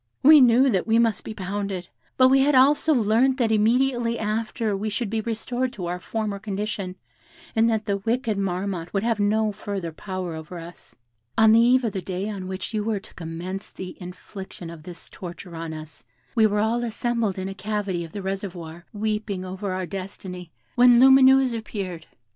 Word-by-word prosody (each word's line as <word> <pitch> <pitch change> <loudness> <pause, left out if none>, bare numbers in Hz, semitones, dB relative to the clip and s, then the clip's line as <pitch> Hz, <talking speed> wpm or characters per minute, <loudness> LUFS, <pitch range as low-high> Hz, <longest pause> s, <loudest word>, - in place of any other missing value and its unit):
"We 300 +1 +9
knew 250 +2 +6
that 190 -1 0
we 225 0 +4
must 230 -2 +2
be 220 - -7
pounded; 195 -2 -4 0.3
but 255 0 +6
we 270 +1 +5
had 280 +1 +3
also 285 +4 +5
learnt 245 +1 +3
that 235 -4 +1
immediately 235 +2 +2
after 220 0 -1
we 210 +2 -2
should 210 0 -3
be 225 -1 0
restored 240 +3 -2
to 185 -7 -5
our 175 +1 -3
former 210 +1 -3
condition, 200 -2 -4 0.6
and 225 +1 +4
that 220 -1 0
the 200 -1 0
wicked 225 +2 -1
Marmotte 185 -2 -2
would 195 - +1
have 230 -2 0
no 215 +1 +2
further 200 -4 -5
power 185 +1 -5
over 160 +2 -8
us. 170 +1 -12 0.4
On 220 -1 +6
the 225 - +6
eve 250 +2 +4
of 225 -4 -1
the 190 - -3
day 185 +2 -4
on 195 -3 -5
which 190 +4 -5
you 215 -1 0
were 215 -1 -1
to - - -16
commence 175 +4 -6
the 185 -1 -8
infliction 180 -1 -9
of 165 -2 -10
this 170 +1 -10
torture 175 -1 -9
on 165 0 -5
us, 155 -3 -9 0.3
we 220 -1 +5
were 210 0 0
all 230 +2 +1
assembled 230 -3 -1
in 190 0 -3
a 195 - -5
cavity 195 -2 -3
of 165 - -9
the 200 +1 -6
reservoir, 175 -4 -5
weeping 210 -3 -2
over 190 +2 -4
our 185 0 -2
destiny, 185 -2 -7 0.2
when 245 -1 +6
Lumineuse 265 -1 +6
appeared. 195 -7 -5
205 Hz, 190 wpm, -24 LUFS, 185-230 Hz, 0.6 s, We